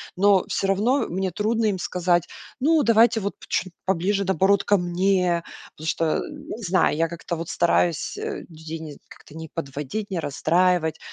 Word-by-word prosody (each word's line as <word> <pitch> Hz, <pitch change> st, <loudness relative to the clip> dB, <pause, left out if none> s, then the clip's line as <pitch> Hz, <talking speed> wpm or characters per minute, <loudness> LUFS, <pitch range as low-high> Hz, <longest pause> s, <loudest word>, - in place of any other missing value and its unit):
Но 195 Hz, 0 st, +4 dB
всё 195 Hz, -, -1 dB
равно 215 Hz, +8 st, +2 dB
мне 190 Hz, +1 st, -2 dB
трудно 220 Hz, +3 st, 0 dB
им 200 Hz, -3 st, 0 dB
сказать: 175 Hz, -1 st, +1 dB, 0.3 s
"Ну, 305 Hz, +3 st, +3 dB
давайте, 230 Hz, 0 st, +5 dB
вот, 200 Hz, -1 st, -3 dB, 0.2 s
чуть 185 Hz, -2 st, -1 dB
поближе, 195 Hz, +2 st, +1 dB
наоборот, 190 Hz, +2 st, +3 dB
ко 205 Hz, -, +3 dB
мне". 180 Hz, -1 st, +1 dB, 0.3 s
Потому 155 Hz, -, -8 dB
что, 160 Hz, 0 st, +1 dB
не 295 Hz, -6 st, -8 dB
знаю, 185 Hz, -6 st, +2 dB
я 165 Hz, +2 st, +1 dB
как-то 170 Hz, +1 st, -5 dB
вот 165 Hz, 0 st, -6 dB
стараюсь 170 Hz, -2 st, +1 dB
людей 165 Hz, -, -6 dB
не 155 Hz, -2 st, -9 dB
как-то 150 Hz, -, -16 dB
не 160 Hz, 0 st, -7 dB
подводить, 150 Hz, +7 st, -5 dB
не 180 Hz, -, -1 dB
расстраивать, 165 Hz, +2 st, +1 dB
185 Hz, 160 wpm, -24 LUFS, 165-205 Hz, 0.3 s, давайте